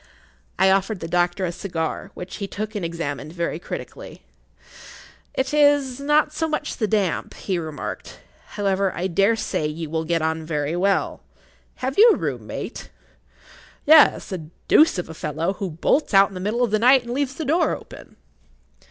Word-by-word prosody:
I 190 0 +4
offered 195 +1 +1
the 165 - -5
doctor 175 +2 +1
a 170 - -2
cigar, 170 -3 -4
which 180 - -7
he 200 - -4
took 215 +2 -5
and 205 -4 -4
examined 155 -3 -4
very 170 -2 -3
critically.[Pg - - -8 0.3
26] - - -26 0.6
"It 265 +2 -1
is 285 -3 +3
not 295 +2 +2
so 320 +1 -1
much 310 -1 -3
the 215 - 0
damp," 200 -4 -1
he 185 -3 -2
remarked. 155 -3 -6 0.4
"However, 195 -1 +1
I 180 - -2
dare 195 +5 +2
say 155 -8 -2
you 155 0 -6
will 160 0 -1
get 165 -1 0
on 160 0 -1
very 155 0 -2
well. 195 +2 0 0.6
Have 270 +6 -2
you 465 +3 +9
a - - +4
room - - -4
mate?" - - -6 1.0
"Yes; 305 -7 +6
a 185 - -3 0.3
deuce 310 -8 +5
of 180 - -3
a 160 - -8
fellow, 160 +4 -2
who 195 0 -4
bolts 185 - 0
out 195 +1 +7
in - - -14
the 185 - -6
middle 215 +6 0
of 235 - 0
the 215 - +2
night 250 +2 +5
and 240 - -7
leaves 270 0 -1
the 320 - -4
door 325 +6 +2
open." - - -13
195 Hz, 185 wpm, -23 LUFS, 170-255 Hz, 1.0 s, you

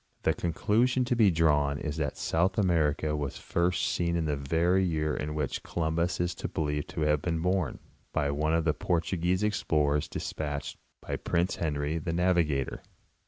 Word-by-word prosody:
The - - +3
conclusion 115 +9 +1
to 120 - +1
be 110 -4 +5
drawn 75 -4 +2
is 75 +1 -4
that 75 -4 -2
South 90 +4 +1
America 80 -6 +2
was 70 -3 -3
first 85 +1 0
seen 85 -1 0
in 85 -1 0
the 75 -1 0
very 85 +7 +2
year 75 -4 0
in 75 +1 -3
which 75 -4 -2
Columbus 85 +1 -1
is 90 0 0
believed 75 -4 -2
to - - -2
have 75 -1 +2
been 80 0 -1
born, 90 -2 0 0.3
by 70 -3 0
one 75 +3 +1
of 80 -1 +1
the 75 - +3
Portuguese 90 +2 0
explorers 75 -8 +1
despatched 75 -2 -4 0.3
by - - -3
Prince 85 +2 0
Henry 75 0 -1
the 80 +1 -3
Navigator. 85 -6 +1
80 Hz, 165 wpm, -29 LUFS, 75-90 Hz, 0.3 s, be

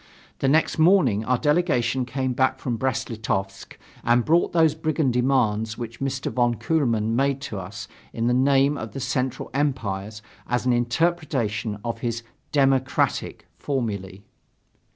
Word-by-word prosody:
The 135 - +1
next 155 +3 +2
morning 155 - +4
our 125 +1 +2
delegation 135 -5 +1
came 130 0 -2
back 130 +1 +1
from 125 -2 -3
Brest 130 0 -2
Litovsk 95 -3 -4 0.3
and 120 0 +3
brought 170 +3 +3
those 160 -3 +4
brigand 155 -4 0
demands 110 -4 +1
which 115 -1 -7
Mr. 135 0 -2
von 120 -1 +1
Kuehlmann 115 -4 0
made 135 +1 +1
to 110 -7 -5
us 95 +3 -8 0.2
in 115 - -2
the 120 - +2
name 140 +2 +3
of 110 - -7
the 135 - -5
Central 130 -1 -2
Empires 110 -7 -2 0.2
as 120 +1 -1
an 125 - +3
interpretation 120 -5 0
of 115 -1 -3
his 115 -1 -3 0.3
"democratic" 135 -2 +1
formulae. 100 -8 -3
125 Hz, 145 wpm, -24 LUFS, 115-140 Hz, 0.3 s, morning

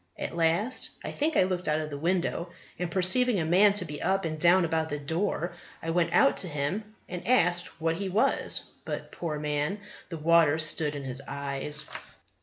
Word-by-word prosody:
At - - -5
last 170 +9 +1
I - - -4
think 310 +2 0
I - - +6
looked 185 -1 -2
out 155 0 +1
of 155 -1 -5
the 145 - -4
window, 175 +1 -1 0.3
and 180 -1 -2
perceiving 195 +6 +2
a 160 - -1
man 195 +5 +5
to 200 -3 +2
be 150 -2 -7
up 195 -1 0
and 155 -1 -4
down 175 +2 +5
about 160 -1 -1
the 145 - -3
door, 170 +3 -2 0.3
I 165 - -2
went 170 0 +1
out 275 - +4
to 185 - -1
him, 180 +9 -3
and 180 +1 -7
asked 175 -10 +2
what 165 0 0
he 195 -1 -3
was; 200 +4 +2 0.2
but, - - -6
poor 160 -3 -4
man, 150 +6 -2 0.3
the 165 - -5
water 160 -1 +4
stood 155 -1 +2
in 140 - -5
his 130 0 -3
eyes. 140 +2 -2
170 Hz, 200 wpm, -28 LUFS, 150-185 Hz, 0.3 s, I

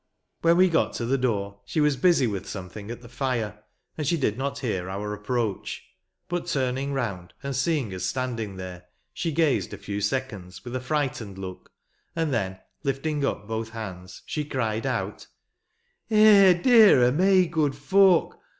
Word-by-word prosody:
When 170 +1 +4
we 185 +1 +6
got 165 -3 +1
to 120 - -3
the 130 +3 +1
door 100 -5 -1
she 130 - -3
was 150 -2 +3
busy 155 0 +3
with 100 -5 -3
something 100 +3 -7
at 120 +1 -7
the - - -11
fire, 115 -4 -3 0.4
and 150 - -1
she 170 - +2
did 120 -8 0
not 140 +2 -3
hear 95 -9 -3
our 105 +2 -4
approach. 105 -1 -3 0.4
But, 175 0 -3
turning 135 +1 -1
round, 95 -10 -4
and 140 -1 -3
seeing 135 - 0
us 90 -1 -5
standing 115 -2 -2
there, 90 -1 -8 0.3
she 165 - -2
gazed 150 -8 +1
a - - -11
few 100 +1 -5
seconds 100 -5 -3
with 120 +1 -5
a - - 0
frightened 125 -8 -2
look, 95 -1 -8 0.4
and 165 -4 0
then 95 -5 -1 0.3
lifting 140 +2 -1
up 105 -7 -2
both 110 0 -3
hands, 95 -5 -8
she 150 - -3
cried 115 -6 -2
out, - - -3 0.5
" - - -46
Eh, 210 -3 +7
dear 210 - +6
o' 120 - +4
me, 185 +5 +4
good 155 -4 0
folk 185 +4 +3
125 Hz, 175 wpm, -26 LUFS, 105-150 Hz, 0.5 s, Eh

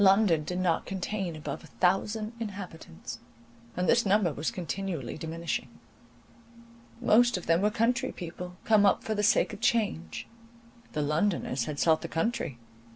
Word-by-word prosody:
London 190 -5 +5
did 180 +4 -3
not 180 -3 +1
contain 190 -2 -3
above 150 -2 -5
a - - -12
thousand 210 +4 0
inhabitants; 165 - -7 0.6
and 180 - +1
this 235 - +5
number 195 -5 +3
was 150 +3 -1
continually 180 - -4
diminishing. 165 +1 -3 1.3
Most 240 -1 +4
of 180 - -7
them 165 +2 +3
were 210 - +4
country 235 +3 +1
people, 180 +1 -7
come 215 -2 +5
up 200 - +4
for 220 - -1
the 210 - 0
sake 210 +1 +3
of 205 - -8
change; 205 - 0 0.7
the 150 - 0
Londoners 150 - 0
had 150 - -4
sought 160 +1 +3
the - - -4
country. 165 - -1
185 Hz, 155 wpm, -29 LUFS, 160-210 Hz, 1.3 s, London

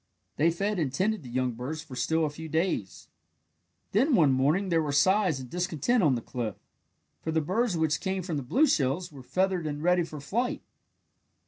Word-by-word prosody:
They 155 +4 +4
fed 200 +4 -1
and 145 -5 0
tended 205 +8 0
the 130 - -10
young 125 +1 0
birds 135 +7 -5
for 145 -6 -10
still 160 +6 +1
a 150 - -2
few 160 +2 -8
days. 160 - -2 0.8
Then 255 +7 +3
one 155 -9 +5
morning 150 +9 +2
there 165 -2 +3
were 150 -2 -2
sighs 185 +1 +3
and 130 - -7
discontent 180 - 0
on 145 -7 +4
the 120 - -3
cliff. 120 -4 -4 0.7
For 160 - -3
the 160 - +2
birds 190 +5 0
which 160 -1 +1
came 190 -1 -2
from 165 -4 -3
the - - -2
blue 250 - +3
shells 155 - 0
were 140 -3 -11
feathered 185 +4 0
and 145 0 -4
ready 180 +1 +4
for 155 -2 -7
flight. 235 - -2
160 Hz, 200 wpm, -28 LUFS, 140-190 Hz, 0.8 s, one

